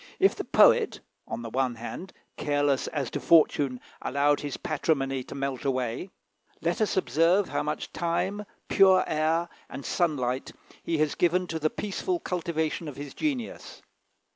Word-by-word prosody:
If - - +4
the - - -5
poet, - - +5 0.3
on 120 - -5
the 115 - -5
one 130 -1 0
hand, 120 +11 -7 0.2
careless 145 -2 +1
as 140 -6 -3
to - - -2
fortune, 145 -5 +4 0.2
allowed 145 +2 +2
his 145 -2 -4
patrimony 135 -4 -1
to - - -9
melt 135 -2 -3
away, 130 +4 -1 0.5
let 170 +5 -1
us 215 - +1
observe 180 +2 +3
how - - -1
much - - -4
time, 190 +5 -1 0.2
pure 190 -2 +6
air, 160 +2 +1 0.2
and 140 - -7
sunlight 135 -7 -1 0.3
he 165 - -1
has 155 -1 +1
given 180 +1 +2
to 165 -2 -4
the 155 0 +1
peaceful 340 - -2
cultivation 165 - -2
of 145 - -6
his 145 -1 -7
genius. 275 -7 -4
155 Hz, 155 wpm, -27 LUFS, 135-175 Hz, 0.5 s, pure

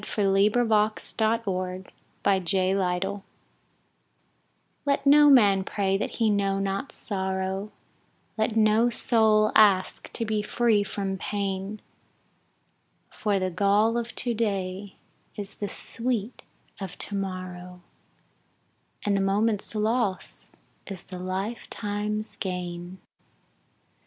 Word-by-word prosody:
Ella 205 -1 0
Wheeler 210 +5 +4
Wilcox 215 -1 +1
Life's 225 +1 +2
Harmonies 185 0 -1 1.6
LET 280 -1 0
no 295 +1 +7
man 205 -8 +6
pray 195 -1 0
that 195 - -2
he 225 -2 +2
know 200 -1 +1
not 195 +6 -2
sorrow, 190 0 -3 0.6
Let 220 0 0
no 220 +2 +4
soul 220 -3 +3
ask 200 -4 +3
to 230 - -2
be 215 -1 0
free 220 0 +2
from 195 -1 -3
pain, 200 +1 -3 1.3
For 205 -3 0
the 185 -1 -1
gall 205 +5 +3
of 235 -1 -3
to 240 -2 -1
day 195 -3 -2 0.4
is 200 -1 -7
the 205 - -3
sweet 230 +1 -3 0.4
of 190 -3 -6
to - - -5
morrow, 180 -2 -5 1.2
And 205 -1 +2
the 195 - +1
moment's 205 +2 0
loss 215 -2 -1 0.4
is 195 -3 -7
the 185 -1 -8
lifetime's 210 +2 -4
gain. 180 -1 -5
200 Hz, 105 wpm, -26 LUFS, 190-220 Hz, 1.6 s, no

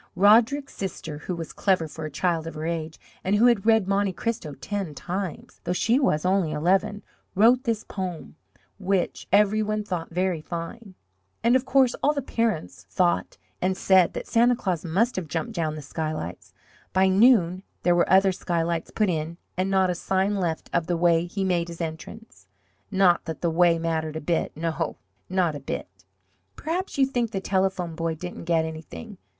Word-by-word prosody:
Roderick's 230 +8 +4
sister, 165 -5 -5
who 180 +3 -4
was 165 -1 -7
clever 185 -5 +1
for 155 +1 -7
a - - -4
child 165 +2 -1
of 165 - -7
her 155 +1 -4
age, 160 -1 -3 0.2
and 195 +2 +1
who 220 +4 +4
had 235 -4 +3
read 220 -4 +4
Monte 200 -1 +1
Cristo 175 -8 -3
ten 185 +2 -4
times, 185 0 -5
though 175 - -1
she 230 +7 +2
was 170 - +1
only 185 -4 +2
eleven, 195 +7 +1 0.3
wrote 235 +6 +5
this 225 -2 -1
poem, 185 -5 -6 0.4
which 190 -2 -1
every 210 +1 +4
one 215 0 -1
thought 180 -5 -4
very 180 -1 -1
fine. 180 +6 -7 0.5
And 235 +2 +4
of 260 0 +2
course 260 -1 +4
all 295 - +3
the 285 - -2
parents 100 - -2
thought 175 - 0 0.2
and 185 +1 0
said 185 -3 +4
that - - -5
Santa 240 +1 +3
Claus 185 -8 -2
must 195 +8 +1
have 180 -4 -3
jumped 160 +1 -3
down 155 -2 -1
the 155 - -7
skylights. 100 - -5 0.4
By 190 0 +4
noon 190 -3 +4 0.2
there 175 - +4
were 175 0 +2
other 190 0 +6
skylights 170 -2 -2
put 215 - +1
in, 165 -1 -2 0.2
and 185 +1 0
not 190 -1 +3
a - - 0
sign 190 +3 0
left 170 -5 -2
of 165 - +1
the 175 - 0
way 170 0 +3
he 195 +2 -3
made 175 -2 +1
his 170 -1 -9
entrance 170 +7 -7 0.4
not 190 -3 +3
that 160 -1 -6
the 170 - +1
way 170 0 +4
mattered 160 -1 -2
a - - -2
bit, 165 +2 0
no, 165 0 -2 0.3
not 185 -4 +1
a 145 - -6
bit. 135 - -5 0.7
Perhaps 345 +4 -3
you 270 - +5
think 245 -4 -1
the 195 - -3
Telephone 190 -3 0
Boy 165 0 -2
didn't 175 +1 -7
get 165 -1 +2
anything! 160 - -8
180 Hz, 185 wpm, -25 LUFS, 165-205 Hz, 0.7 s, other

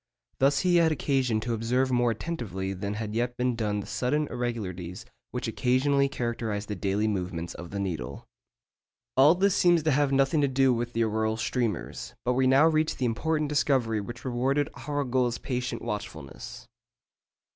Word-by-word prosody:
Thus 135 +2 +3
he 180 -1 +3
had 165 -1 +4
occasion 135 -6 +1
to 120 +2 -2
observe 125 +4 +1
more 120 -1 +3
attentively 110 - -3
than 100 +2 -4
had 105 -1 -4
yet 120 +2 -1
been 125 -1 +1
done 105 -2 -1
the - - -9
sudden 150 +5 0
irregularities 110 -5 -4 0.2
which 125 -1 -4
occasionally 135 +4 +2
characterise 115 -5 -3
the 105 - -4
daily 100 +3 0
movements 90 -4 -3
of 85 0 -9
the 100 - -4
needle. 85 -11 -4 0.9
All 145 +6 +7
this 195 +1 +3
seems 175 -3 +4
to 155 - +2
have 145 0 +2
nothing 135 +3 +3
to 140 - +3
do 135 -1 +3
with 120 +1 -3
the 115 - +2
auroral 110 0 0
streamers; 115 -3 -2
but 125 - +2
we 130 +1 +2
now 135 +4 +6
reach 155 -1 +1
the 130 - 0
important 150 +6 0
discovery 130 -7 +1
which 120 +5 -8
rewarded 135 +4 +1
Arago's 130 -4 -1
patient 125 -2 -3
watchfulness. 100 - -6
120 Hz, 170 wpm, -27 LUFS, 110-135 Hz, 0.9 s, All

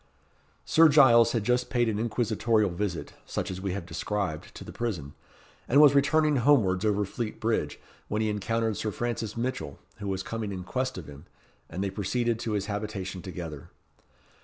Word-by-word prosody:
Sir 165 0 +6
Giles 120 -6 +6
had 115 -4 0
just 125 +2 +1
paid 120 -1 +1
an 105 -2 -1
inquisitorial 110 -2 +1
visit, 90 -1 -3
such - - -3
as 95 0 -6
we 95 -2 -2
have 95 -3 -5
described, 90 -1 -3
to - - -8
the - - -9
prison, 90 -13 -4 0.5
and 140 - +4
was 145 -2 +8
returning 150 +1 +3
homewards 115 -8 +3
over 105 -1 +1
Fleet 110 +3 -5
Bridge, 110 -10 -1 0.3
when 105 +1 -1
he - - +1
encountered 110 +2 -1
Sir 110 - -2
Francis 115 0 -3
Mitchell, 120 - -3 0.2
who 100 - -6
was 95 -1 -2
coming 110 -1 -4
in 95 -2 -5
quest 130 +6 -2
of 90 - -7
him, 70 +2 -12 0.4
and 90 +4 -3
they 100 - -2
proceeded 115 +4 -1
to 115 -2 -3
his 100 -2 -1
habitation 100 -3 -4
together. 85 -6 -7
105 Hz, 180 wpm, -28 LUFS, 95-120 Hz, 0.5 s, was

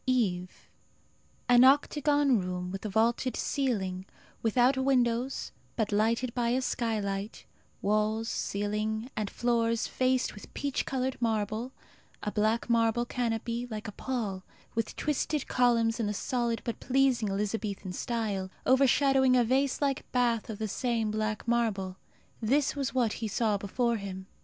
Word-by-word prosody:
EVE. 185 -8 0 0.8
An 245 -1 +7
octagon 285 -1 +4
room, 180 -1 -4
with 195 +1 -6
a 215 - -3
vaulted 230 +5 +1
ceiling, 195 -9 -1 0.3
without 245 +4 +3
windows 255 -1 +1 0.2
but 220 -3 -1
lighted 230 +4 +1
by 240 -2 0
a 255 +2 +1
skylight; 210 -4 -2 0.4
walls, 215 +2 +1
ceiling, 215 +3 -2
and 210 -2 -2
floors 230 -1 +1
faced 255 0 +1
with 210 - -12
peach 280 -2 -2
coloured 260 -1 -2
marble; 220 +2 -1 0.5
a 210 - -1
black 215 +2 +1
marble 230 0 +2
canopy, 235 0 -2
like 215 0 -5
a - - -4
pall, 210 -6 -3 0.3
with 230 -1 -2
twisted 300 -1 -1
columns 235 -2 +2
in 225 - 0
the 210 - -2
solid 235 -1 -1
but 235 - -4
pleasing 255 -4 +2
Elizabethan 200 -1 -3
style, 205 -4 -2 0.2
overshadowing 265 0 +4
a 245 - +5
vase 265 +4 +1
like 275 -1 -1
bath 240 -3 +1
of 215 - -4
the 220 0 -2
same 230 0 -1
black 215 +1 -2
marble 215 -6 0 0.5
this 275 +7 +2
was 275 -3 -1
what 235 -4 +2
he 225 - -1
saw 215 +1 +1
before 230 +4 0
him. 190 -2 -6
230 Hz, 140 wpm, -29 LUFS, 210-255 Hz, 0.8 s, An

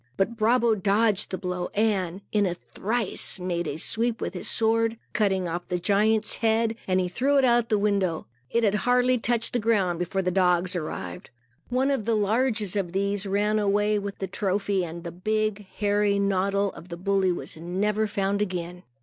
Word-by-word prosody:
But 215 +5 0
Brabo 230 +1 +3
dodged 205 0 +1
the 185 - -3
blow 180 -1 -3
and, 200 -4 0
in 205 -2 +2
a 175 - -2
trice, 215 +1 -1
made 175 -2 -2
a 145 - -3
sweep 230 +6 0
with - - -3
his 180 - -3
sword. 225 0 +1 0.2
Cutting 190 -4 +1
off 175 +1 -4
the 180 - -1
giant's 210 +4 +2
head, 225 0 +1
he 185 -1 +1
threw 265 +10 +1
it 270 - +4
out 240 -1 +3
the 215 - +3
window. 200 -5 0 0.2
It 235 - +1
had 205 -2 +3
hardly 250 +3 +2
touched 230 0 0
the 245 - +1
ground, 200 -6 +1
before 185 +2 -1
the 180 - 0
dogs 180 -1 +2
arrived. 95 - -5 0.4
One 260 +3 +1
of 265 -7 -1
the 230 0 +2
largest 215 -1 +1
of 185 -4 -2
these 200 +1 0
ran 210 +2 +1
away 205 +1 +2
with 200 -1 -6
the 195 - -3
trophy 195 0 -1
and 170 0 -7
the 170 - -5
big, 215 +2 -2
hairy 205 0 +1
noddle 200 0 +1
of 175 - -12
the 170 - -6
bully 190 0 +1
was 175 - -4
never 200 +6 -1
found 200 0 -1
again. 180 -3 -3
200 Hz, 185 wpm, -26 LUFS, 185-220 Hz, 0.4 s, it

